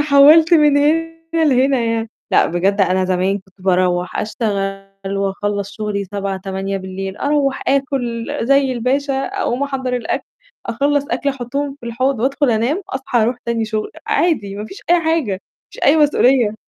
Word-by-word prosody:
حوّلت 300 +4 +6
من 295 -3 +5
هنا 325 +3 +2 0.2
لهنا 275 -4 +3
يعني؟ 230 -1 -1 0.2
لأ - - +4
بجد 190 +4 0
أنا 185 0 +2
زمان 185 +2 0
كنت 190 0 -24
بارُوح 180 -1 +1
أشتغل 195 -2 -3
وأخلّص 200 +1 -2
شُغلي 210 -2 -2
19:00، 195 0 -4
20:00 190 0 -5
أرَوَّح 280 -2 0
آكُل 260 -4 -1 0.2
زي 275 0 +3
الباشا 265 +4 0
أقوم 370 -10 -2
أحضّر 260 -3 -2
الأكل، 245 - -3 0.4
أخلّص 280 +4 +1
أكل 265 +4 -1
أحُطّهم 275 +2 -3
في 235 - -9
الحوض 255 +1 -1
وأدخل 275 +1 +1
أنام، 240 - 0
أصحى 260 - -1
أرُوح 235 +3 0
تاني 230 -1 0
شُغل، 215 -1 -3 0.2
عادي 210 - 0
ما 210 - -5
فيش 385 - -10
أي 350 0 +5
حاجة، 320 -9 0
ما 190 - -3 0.4
فيش - - -12
أي 295 - +5
مسؤولية. 265 -7 +3
235 Hz, 155 wpm, -18 LUFS, 195-280 Hz, 0.4 s, حوّلت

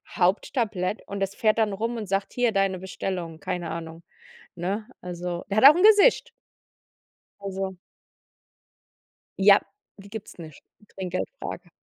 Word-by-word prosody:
Haupttablett 200 +1 0
und 200 - -5
das 195 0 -1
fährt 215 -1 +2
dann 215 -3 +1
rum 230 +4 -2
und 215 -3 -5
sagt: 195 +1 -1
„Hier, 245 -2 +2
deine 195 -1 +1
Bestellung", 180 -3 -5
keine 170 +2 -4
Ahnung, 165 0 -7 0.5
ne? 195 +5 -3
Also, 175 -1 -5
der 200 - 0
hat 240 - +4
auch 290 - +10
'n 360 - +2
Gesicht. 430 +3 +6 1.1
Also 195 -1 -4 1.6
Ja, 200 +1 +7 0.4
die 195 - -13
gibt's 210 -2 -9
nicht, 155 -4 -11 0.3
Trinkgeldfrage. 185 0 -5
195 Hz, 130 wpm, -25 LUFS, 180-215 Hz, 1.6 s, auch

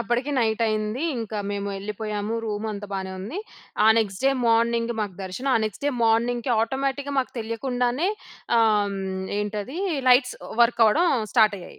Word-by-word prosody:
అప్పటికి 240 +5 -1
నైట్ 225 -1 +1
అయింది. 215 +5 -1 0.2
ఇంకా 220 -2 -4
మేము 200 0 -3
వెళ్ళిపోయాము. 210 +2 -4
రూమంతా 210 -1 -4
బానే 190 -1 -3
ఉంది. 220 - -5 0.5
ఆ - - +6
నెక్స్ట్ 200 -1 -2
డే 270 - +5 0.2
మార్నింగ్ 230 +1 +2
మాకు 205 -4 -3
దర్శనం, 190 +9 -3
ఆ - - +3
నెక్స్ట్ 215 +6 -5
డే 290 - +2
మార్నింగ్‌కి 235 +2 +1
ఆటోమేటిక్‌గా 275 +3 -1
మాకు 255 - 0
తెలియకుండానే 245 - -1 0.5
ఆహ్, 215 -2 +4
హ్మ్. 190 -1 -4 0.2
ఏంటది? 210 - -4 0.3
లైట్స్ 250 0 +5 0.3
వర్క్ 235 0 +2
అవ్వడం 320 +12 +4 0.3
స్టార్ట్ 215 -4 +5
అయ్యాయి. 175 - -12
225 Hz, 155 wpm, -24 LUFS, 210-245 Hz, 0.5 s, ఆ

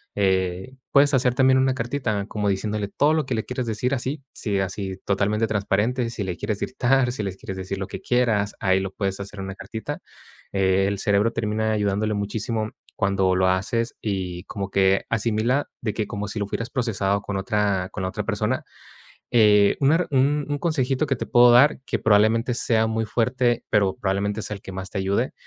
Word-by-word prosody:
eh, 95 +3 0 0.2
puedes 145 +1 +5
hacer 125 -2 +2
también 130 0 +4
una 130 0 +2
cartita 115 -5 -2
como 105 -2 -1
diciéndole 105 +1 -1
todo 145 +8 +2
lo 155 -4 0
que 130 - -1
le 110 - -2
quieres 125 -1 -3
decir 115 +4 -1
así. 135 +3 -3
Si 100 -4 -1
así 95 0 -3
totalmente 105 +2 +1
transparente, 110 +4 0
si 115 -3 -4
le 90 -2 -3
quieres 105 +2 -3
gritar, 130 0 +1
si 120 - -4
le 95 -2 -4
quieres 95 - -7
decir 95 +1 -4
lo 95 - -3
que - - -7
quieras, 115 -5 +1
ahí 95 -1 +2
lo 95 0 -4
puedes 95 0 -3
hacer 100 +1 -8
en 95 - -4
una 95 0 -6
cartita, 100 +3 -6 0.5
eh, 95 0 +2
el 100 - -1
cerebro 100 +3 +2
termina 110 -1 -1
ayudándole 105 +1 0
muchísimo 110 +2 -2 0.3
cuando 95 -2 +2
lo 95 0 +3
haces, 100 +6 0
y 95 -4 -3
como 100 -1 -5
que 95 0 +2
asimila 115 +4 +1
de 110 -4 -2
que 110 - -1
como 105 0 -4
si 110 - -6
lo 100 - -1
fueras 115 +3 -4
procesado 100 -6 0
con 100 - -4
otra 95 -2 0
con 95 - -5
la 95 - -1
otra - - -4
persona, - - -1 0.7
eh, 105 -3 +5
una 160 +6 +3
un 145 +2 +1
consejito 145 -3 0
que 135 -2 0
te - - -5
puedo 120 0 +6
dar 135 +5 +5
que - - -1
probablemente 110 +3 +3
sea 110 -2 +1
muy 110 0 -1
fuerte, 120 +2 +1
pero 100 -2 +2
probablemente 100 -1 -1
sea 105 - -4
el 100 - -15
que - - -8
más 95 0 -6
te 105 - -4
ayude. 100 +6 0
105 Hz, 200 wpm, -24 LUFS, 100-120 Hz, 0.7 s, puedo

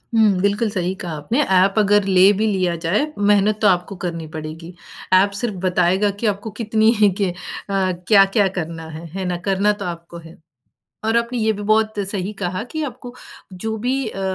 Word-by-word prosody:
हुँ, 220 -2 +5
बिल्कुल 205 +3 +1
सही 185 -3 -2
कहा 175 - -5
आपने 225 - 0 0.2
ऐप 190 +2 +4
अगर 205 0 +4
ले 190 0 +5
भी 220 - +2
लिया 185 -4 0
जाए, 205 - +2
मेहनत 205 +1 +2
तो 210 - +4
आपको 185 +1 +1
करनी 170 -3 -5
पड़ेगी, 160 +2 -7 0.4
ऐप 190 +2 +5
सिर्फ 230 -4 -2
बताएगा 185 +3 +2
कि 230 - 0
आपको 205 +1 -2
कितनी 220 0 +3
ही 210 -1 +6
की 195 - +2
अ, - - -5 0.4
क्या-क्या 195 +2 +3
करना 165 -1 -6
है, 160 +1 -8
है 190 +2 -4
ना 180 -1 -2
करना 195 +2 +2
तो - - -3
आपको 170 -1 -7
है। 165 - -15 0.7
और 225 +1 +1
आपने 235 +1 -2
ये 220 -1 +2
भी 205 -1 -6
बहुत 215 0 +1
सही 200 0 -3
कहा 185 +1 -3
कि 315 - -3
आपको 250 -2 -8 0.4
जो 220 +5 -4
भी 255 +3 -1
अ, 195 - -7
200 Hz, 190 wpm, -20 LUFS, 180-215 Hz, 0.7 s, ही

